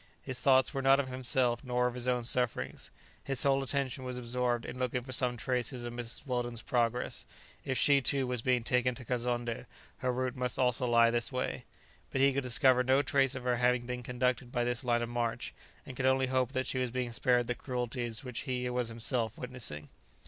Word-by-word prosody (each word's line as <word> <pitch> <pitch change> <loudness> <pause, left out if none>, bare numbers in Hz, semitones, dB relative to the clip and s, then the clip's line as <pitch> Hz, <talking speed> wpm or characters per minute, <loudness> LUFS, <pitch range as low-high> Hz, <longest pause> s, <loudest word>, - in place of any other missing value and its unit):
His 130 -1 -6
thoughts 130 +1 +4
were 135 - -1
not 135 +1 +5
of 135 -2 -1
himself 125 -1 +1
nor 125 -1 0
of 125 - 0
his 125 0 -4
own 125 -1 +1
sufferings; 125 0 -1 0.3
his 135 -2 +2
whole 135 -1 +3
attention 135 -1 -1
was 125 -1 -4
absorbed 120 -1 -1
in 125 - -7
looking 125 -1 -1
for 130 - -9
some 125 -1 +1
traces 125 +1 -2
of 120 - -5
Mrs. 120 +3 -5
Weldon's 120 -3 -3
progress; 120 0 0 0.4
if 130 - -1
she, 140 -1 +5
too, 135 +1 +1
was 125 -2 -2
being 125 -1 +1
taken 125 +1 +1
to 125 - -10
Kazonndé, 120 -1 -2 0.3
her 130 - 0
route 130 +1 -2
must 125 -2 -2
also 125 -1 +2
lie 115 -1 +5
this 120 +1 -1
way. 125 -1 -3 0.4
But 135 - -2
he 135 0 +5
could 140 - 0
discover 130 0 +5
no 130 +2 +3
trace 135 -1 +2
of 130 - -6
her 125 -1 +1
having 125 0 +2
been 125 0 -4
conducted 125 0 -1
by 120 -1 0
this 120 +1 -2
line 120 -1 +1
of 120 - -4
march, 120 -1 -2 0.3
and 130 - -8
could 130 +1 0
only 130 0 +3
hope 130 -1 0
that 130 -1 0
she 130 - -1
was 125 -1 0
being 125 0 -3
spared 120 0 +2
the 120 - -1
cruelties 125 -2 -4
which 125 -3 -5
he 125 -1 -1
was 125 -1 -1
himself 115 0 -1
witnessing. 110 - -5
125 Hz, 215 wpm, -31 LUFS, 120-130 Hz, 0.4 s, not